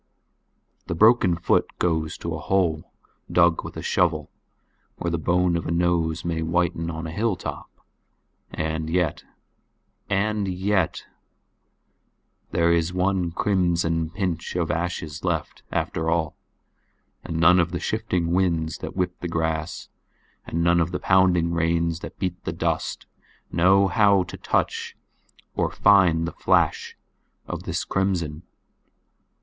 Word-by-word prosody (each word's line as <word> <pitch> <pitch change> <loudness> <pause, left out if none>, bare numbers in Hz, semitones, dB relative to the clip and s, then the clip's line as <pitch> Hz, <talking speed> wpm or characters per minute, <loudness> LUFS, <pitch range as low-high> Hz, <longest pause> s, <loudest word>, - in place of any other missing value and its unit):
The 85 - -2
broken 110 -2 +5
foot 85 - +1
goes 80 -3 -1
to - - -4
a - - -4
hole 85 -5 0 0.4
dug 85 -1 +3
with - - -8
a - - -5
shovel - - +1 0.7
or 85 - -2
the 85 - -1
bone 90 +1 +2
of 85 - -2
a - - -2
nose 85 -1 0
may 85 -1 -1
whiten 85 0 0
on 80 0 -5
a 80 - -5
hilltop—and 80 -5 -5
yet—"and 100 +4 -3 2.0
yet"—There 85 0 +2
is 85 0 +1
one 90 -1 0
crimson 85 -3 +1
pinch 90 -3 -3
of 85 -3 0
ashes 85 0 -3
left 85 -4 -2
after 80 0 -1
all; 80 -2 0 0.9
and 80 - -4
none 90 +2 +6
of 85 -1 +2
the 85 - -3
shifting 85 -2 -1
winds 85 -4 0
that - - -7
whip 90 -1 -2
the 90 - -4
grass 80 -1 -2 0.6
and 85 +1 -1
none 85 0 +4
of 80 - 0
the 90 - -2
pounding 90 -3 +3
rains 85 0 0
that - - -9
beat 90 -2 -3
the - - -2
dust, - - -2 0.5
know 95 +3 +4
how 100 0 +4
to 90 - -9
touch - - -1 0.6
or - - 0
find 90 -5 +4
the - - -4
flash - - +1 0.5
of - - -5
this - - -2
crimson. 85 -5 -1
85 Hz, 130 wpm, -24 LUFS, 80-90 Hz, 2.0 s, none